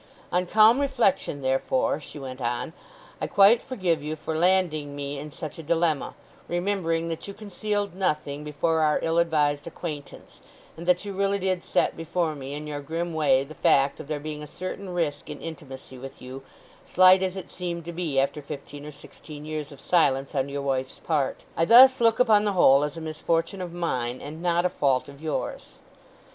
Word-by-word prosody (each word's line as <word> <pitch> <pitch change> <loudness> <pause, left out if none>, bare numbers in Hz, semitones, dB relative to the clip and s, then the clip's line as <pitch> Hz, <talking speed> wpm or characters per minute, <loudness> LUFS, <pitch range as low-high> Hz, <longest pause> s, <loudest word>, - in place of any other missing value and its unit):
"On 180 0 +1
calm 220 +6 +6
reflection, 240 - 0
therefore," 130 +2 +1
she 150 - -11
went 130 -2 -7
on, 120 +7 -2 0.5
"I - - -1
quite 205 +4 +6
forgive 185 - -1
you 155 +1 -4
for 155 +1 -5
landing 160 -4 +1
me 140 0 -4
in 150 +2 -7
such 155 +2 -8
a - - -4
dilemma, 160 -2 0 0.3
remembering 175 -2 -1
that 165 +3 -5
you 200 - -7
concealed 205 -1 -3
nothing 150 -6 -2
before 155 +2 0
our 155 -1 +3
ill 165 +1 +2
advised 150 -3 +1
acquaintance; 155 -4 -8 0.3
and 170 +2 -9
that 180 +2 +2
you 200 - -5
really 200 +1 +1
did 185 -2 -1
set - - +1
before 165 0 -1
me 140 -1 -7
in 150 +1 -6
your 145 -1 -5
grim 165 +4 -4
way 140 -4 +3
the 145 +3 -11
fact 140 -1 +2
of 155 - -8
there 150 -1 -3
being 150 0 -6
a 150 - -8
certain 185 +4 -6
risk 160 -5 -2
in - - -7
intimacy 135 -5 -9
with 135 +1 -10
you, 130 +1 -9 0.4
slight 185 +1 +6
as 190 0 -2
it 190 - -8
seemed 170 -2 -5
to 170 - -6
be 165 -6 -1
after 140 +2 0
fifteen 145 0 -9
or - - -7
sixteen 150 +1 -12
years 155 -1 -5
of 140 - -12
silence 135 -4 +2
on 135 -1 -1
your 140 0 -4
wife's 130 -1 -2
part. 150 -5 -1
I 165 - +2
thus 260 +5 +8
look 230 -1 +4
upon 220 -4 +5
the 205 -1 0
whole 140 -6 +5
as 150 +2 -3
a - - -6
misfortune 165 +4 -2
of 180 -2 -5
mine, 130 -8 -2
and 155 +3 -8
not 175 0 +1
a - - +3
fault 135 -7 +1
of 140 +1 -13
yours. 155 -2 -4
160 Hz, 195 wpm, -26 LUFS, 145-180 Hz, 0.5 s, thus